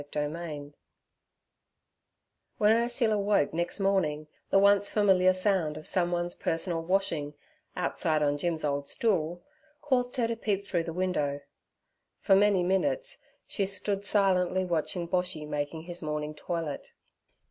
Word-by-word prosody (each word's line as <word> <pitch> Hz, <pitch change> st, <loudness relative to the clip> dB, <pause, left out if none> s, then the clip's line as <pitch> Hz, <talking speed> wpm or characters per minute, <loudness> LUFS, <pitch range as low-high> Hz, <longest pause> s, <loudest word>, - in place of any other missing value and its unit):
Chapter 145 Hz, 0 st, -3 dB
10 150 Hz, -3 st, -7 dB, 1.8 s
WHEN 210 Hz, 0 st, +4 dB
Ursula 230 Hz, -2 st, +1 dB
woke 200 Hz, -8 st, +2 dB
next 170 Hz, +5 st, -2 dB
morning, 190 Hz, -7 st, +1 dB, 0.2 s
the -, -, +4 dB
once 200 Hz, 0 st, +4 dB
familiar 190 Hz, -3 st, +4 dB
sound 185 Hz, -5 st, 0 dB
of 155 Hz, -, -9 dB
someone's 175 Hz, -1 st, 0 dB
personal 165 Hz, 0 st, -2 dB
washing, 165 Hz, -5 st, -1 dB, 0.4 s
outside 155 Hz, -1 st, 0 dB
on 145 Hz, 0 st, +1 dB
Jim's 165 Hz, -1 st, -1 dB
old 140 Hz, -1 st, -1 dB
stool, 175 Hz, -6 st, 0 dB, 0.4 s
caused 250 Hz, -4 st, 0 dB
her 240 Hz, -3 st, +1 dB
to 230 Hz, -, -2 dB
peep 200 Hz, -3 st, -2 dB
through 170 Hz, -4 st, -1 dB
the 165 Hz, -, -4 dB
window. 160 Hz, -5 st, -1 dB, 0.8 s
For 195 Hz, -, +4 dB
many 200 Hz, -2 st, +4 dB
minutes -, -, 0 dB, 0.3 s
she 195 Hz, -2 st, -1 dB
stood 200 Hz, 0 st, -2 dB
silently 185 Hz, -2 st, +2 dB
watching 170 Hz, 0 st, -2 dB
Boshy 180 Hz, -4 st, -2 dB
making 150 Hz, +2 st, -3 dB
his 175 Hz, +1 st, -5 dB
morning 150 Hz, -1 st, -3 dB
toilet. 165 Hz, -2 st, -5 dB
180 Hz, 135 wpm, -29 LUFS, 155-200 Hz, 1.8 s, WHEN